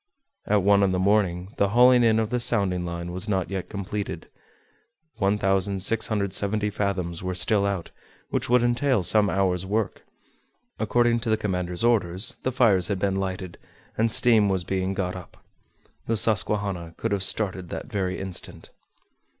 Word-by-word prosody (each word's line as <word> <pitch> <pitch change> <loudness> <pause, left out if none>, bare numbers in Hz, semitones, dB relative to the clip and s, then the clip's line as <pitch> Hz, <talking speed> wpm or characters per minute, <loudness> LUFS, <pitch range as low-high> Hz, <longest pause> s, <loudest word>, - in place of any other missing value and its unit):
At 105 -2 +2
one 100 0 +4
in 95 -2 +2
the - - 0
morning, 95 -1 +1
the 100 - +2
hauling 125 +2 +5
in 110 -1 +4
of 110 0 -1
the 125 - 0
sounding 100 -7 0
line 85 0 -5
was 95 +4 -4
not 95 -3 -1
yet 95 -2 -4
completed; 100 0 -5 0.9
1,670 100 +1 0
fathoms 90 -4 -2
were 90 0 -3
still 100 +2 +2
out, 95 -4 -4 0.4
which - - -2
would 125 0 +4
entail 120 -2 +1
some 105 +3 +4
hours' 95 -2 0
work. 105 0 -2 0.8
According 120 -1 +2
to 115 - -3
the 110 - +2
commander's 90 -3 -3
orders, 105 -3 +1
the 130 - -1
fires 110 -9 +3
had 100 - -1
been 95 0 -1
lighted, 95 -2 -4 0.4
and 115 +1 +1
steam 110 -4 +4
was 95 -2 0
being 95 +2 -2
got 90 -2 -2
up. 90 -1 -12 0.6
The 115 - 0
Susquehanna 100 -5 +1
could 115 - -3
have 100 -1 0
started 95 -2 -1
that - - -6
very 95 -5 -3
instant. 95 -2 -6
100 Hz, 160 wpm, -25 LUFS, 95-110 Hz, 0.9 s, hauling